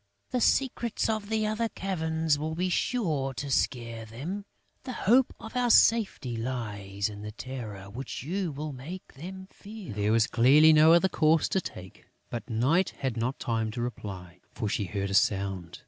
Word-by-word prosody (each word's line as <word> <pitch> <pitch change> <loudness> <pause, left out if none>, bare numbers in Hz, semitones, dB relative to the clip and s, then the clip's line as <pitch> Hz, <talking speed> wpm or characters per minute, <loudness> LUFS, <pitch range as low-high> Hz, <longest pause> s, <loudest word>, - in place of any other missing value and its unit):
The 250 - 0
secrets 240 -2 +1
of 215 -2 -2
the 220 -1 +1
other 215 +2 0
caverns 160 -6 -1
will 160 +1 -3
be 180 +2 0
sure 155 - 0
to 140 +1 -4
scare 115 -3 -1
them. 150 - -6 0.4
The 255 - -5
hope 245 +5 +5
of 225 - -10
our 250 -1 +2
safety 210 - +4
lies 105 -5 -3
in 105 -1 -8
the 105 0 -6
terror 110 -5 -7
which 125 +7 -6
you 180 +3 -2
will 150 +1 -5
make 155 +9 -9
them 190 +6 -8
feel." 205 - -9
There 105 +1 0
was 115 -1 +4
clearly 145 +8 +6
no 155 +1 +7
other 170 +3 +5
course 160 -3 +3
to 190 - +1
take. 95 - -10 0.2
But 120 - -5
Night 135 +11 +2
had 130 -4 -2
not 120 +4 -1
time 110 -2 -1
to 120 - -3
reply, 95 -7 -7
for 110 - -3
she 100 0 -1
heard 100 +1 -3
a - - -2
sound. 95 -4 +1
135 Hz, 180 wpm, -28 LUFS, -, 0.4 s, no